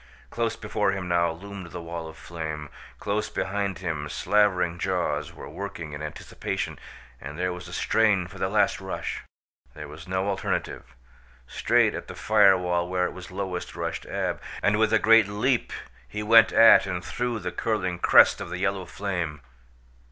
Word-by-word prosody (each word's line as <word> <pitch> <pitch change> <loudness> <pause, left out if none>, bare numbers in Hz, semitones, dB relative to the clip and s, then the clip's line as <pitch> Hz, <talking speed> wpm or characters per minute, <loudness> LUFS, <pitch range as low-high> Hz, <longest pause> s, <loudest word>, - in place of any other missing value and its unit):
Close 115 -1 -1
before 105 -2 -1
him 95 -2 -4
now 85 -1 +2
loomed 95 +2 -8
the 85 - -7
wall 85 -1 -6
of 80 - -11
flame. 80 -3 -6 0.3
Close - - -2
behind 100 -1 -2
him 80 -5 -4
slavering 90 -3 +1
jaws 85 -6 -1
were - - -10
working 80 -3 -7
in 75 - -6
anticipation, 75 -1 -5 0.4
and 70 +2 -8
there 90 0 -1
was 90 0 -9
a - - -10
strain 100 +1 +2
for 95 +3 -11
the 95 - 0
last 105 +1 +2
rush. - - -4 0.5
There 75 -1 -8
was 75 +3 -11
no 95 +1 -1
alternative. 95 - -3 0.5
Straight - - +2
at - - -6
the - - -8
fire 105 -3 +5
wall 90 -1 -1
where 90 0 +1
it - - -3
was 90 -1 -10
lowest 95 -2 -5
rushed - - -4
Ab, - - -2 0.2
and 105 +1 +3
with 110 - +3
a 110 - +5
great 115 -1 +6
leap 115 +5 0 0.4
he 105 +11 -5
went 115 +2 +7
at 115 -3 +7
and 90 -2 -4
through 120 -1 -2
the - - -4
curling 90 -6 -2
crest - - +6
of - - -6
the 90 - -4
yellow 95 0 -1
flame! 85 -7 -3
90 Hz, 175 wpm, -26 LUFS, 85-105 Hz, 0.5 s, went